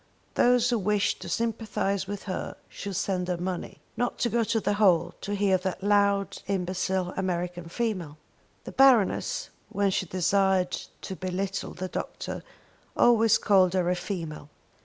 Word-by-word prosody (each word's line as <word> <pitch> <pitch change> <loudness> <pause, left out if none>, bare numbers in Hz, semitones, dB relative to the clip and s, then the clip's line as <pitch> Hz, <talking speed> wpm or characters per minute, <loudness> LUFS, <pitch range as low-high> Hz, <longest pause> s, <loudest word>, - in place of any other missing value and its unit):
Those 245 0 +4
who 235 - +2
wished 205 0 +1
to - - -6
sympathise 215 -4 -1
with 205 0 -5
her 185 - -4
should 200 -1 -6
send 180 0 -1
her 180 -1 -1
money, 180 0 -4 0.2
not 245 0 -1
go 235 0 +2
to 225 +1 +1
the 205 - 0
hall 180 -5 +3
to 205 - -3
hear 195 -2 +2
that 190 0 -4
loud 200 -1 +2
imbecile 185 -1 -1
American 175 -2 -3
female! 185 -8 -3 0.5
The - - -7
Baroness, 255 -7 +3 0.2
when 200 -1 +1
she 185 - -1
desired 185 +1 +2 0.3
to 190 - -5
be 185 - -5
little 195 +2 -3
the 185 +1 -4
doctor, - - -5 0.6
always 225 -2 +5
called 190 -3 +4
her 180 -1 +2
a - - +1
female. 165 -6 -5
190 Hz, 155 wpm, -27 LUFS, 180-205 Hz, 0.6 s, always